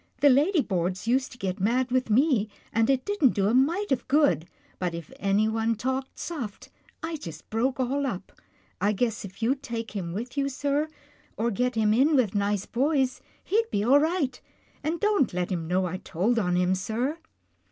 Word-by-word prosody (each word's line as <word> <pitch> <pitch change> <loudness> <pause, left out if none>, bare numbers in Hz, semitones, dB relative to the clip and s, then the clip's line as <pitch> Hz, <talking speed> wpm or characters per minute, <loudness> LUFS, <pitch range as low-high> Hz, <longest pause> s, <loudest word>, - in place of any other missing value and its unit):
" - - -35
The 285 - +7
ladyboards 220 - +2
used 255 +3 +1
to 245 - -12
get 190 -4 -3
mad 245 +6 +1
with 255 -2 +1
me, 235 -2 +3 0.2
and 225 +2 +2
it 265 -1 +2
didn't 360 - +2
do 195 - +2
a 210 - +2
mite 325 +11 +2
of 255 -2 0
good, 190 - +3 0.3
but 180 -2 -1
if 170 -2 -8
anyone 220 +3 +1
talked 260 +4 -3
soft, 250 -12 -6 0.3
I 325 -1 -3
just 160 - -9
broke 255 +5 0
all 270 +2 0
up. 195 -5 -5 0.5
I 205 +2 +3
guess 225 +1 -1
if 200 +3 -8
you'd 265 +4 +1
take 230 -4 -5
him 180 -5 -4
with 230 +9 -5
you, 280 -1 0
sir, 285 +3 0 0.5
or 235 +2 0
get 250 +3 0
him 215 -1 +3
in 280 +7 +4
with 240 -7 +2
nice 205 -1 0
boys, 265 0 0 0.2
he'd 450 +3 +1
be 200 - 0
all 265 +6 +6
right 305 -5 0 0.2
— - - -34
and 320 +3 -1
don't 405 - +2
let 180 +1 -1
him 165 -3 -2
know 185 +2 +1
I 180 +1 -3
told 195 +7 0
on 180 -4 +1
him, 180 +1 +2
sir." 230 - -2
235 Hz, 195 wpm, -27 LUFS, 200-275 Hz, 0.5 s, The